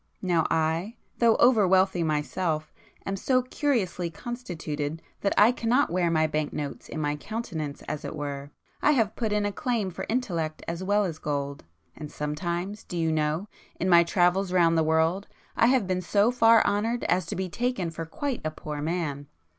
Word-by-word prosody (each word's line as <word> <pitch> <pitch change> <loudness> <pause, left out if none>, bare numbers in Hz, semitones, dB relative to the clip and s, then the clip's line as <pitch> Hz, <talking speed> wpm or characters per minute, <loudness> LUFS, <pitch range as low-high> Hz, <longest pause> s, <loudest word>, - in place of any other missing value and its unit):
Now 175 -3 +2
I, 165 +7 0 0.2
though 230 -2 +5
over 230 -5 +5
wealthy 190 -1 +3
myself, 155 0 -1 0.3
am 195 - -2
so 255 +6 +1
curiously 235 - -1
constituted 165 - -5 0.2
that 200 - 0
I 215 +3 +7
cannot 250 +3 +1
wear 175 -1 +1
my 160 -1 +3
bank 155 -1 -1
notes 145 -2 -5
in - - -5
my 145 -1 0
countenance 160 -5 -5
as 150 -1 -5
it - - -5
were,—I 145 - -3
have 225 -5 +1
put 225 -3 -1
in 210 0 +1
a 205 - 0
claim 230 -5 -1
for - - -6
intellect 170 -10 -2
as 170 +2 -3
well 205 +2 +2
as 160 -4 -4
[p - - -6
185] 140 - -3 0.4
gold,—and 150 -1 -6
sometimes, 175 +8 -3
do 175 - -6
you 165 -1 +1
know, 155 +5 0 0.3
in 185 - 0
my 170 -1 +7
travels 180 +2 +2
round 170 -2 +4
the 160 - +3
world, 160 +5 +1 0.3
I 230 - +4
have 255 -4 +3
been 185 0 -1
so 205 +5 +3
far 230 -2 +5
honoured 225 +4 0
as 180 -1 +1
to - - -3
be 190 +1 -2
taken 235 -3 -2
for 165 0 -5
quite 270 - -3
a 155 - 0
poor 150 -1 -6
man! 150 -3 -2
175 Hz, 185 wpm, -27 LUFS, 155-210 Hz, 0.4 s, I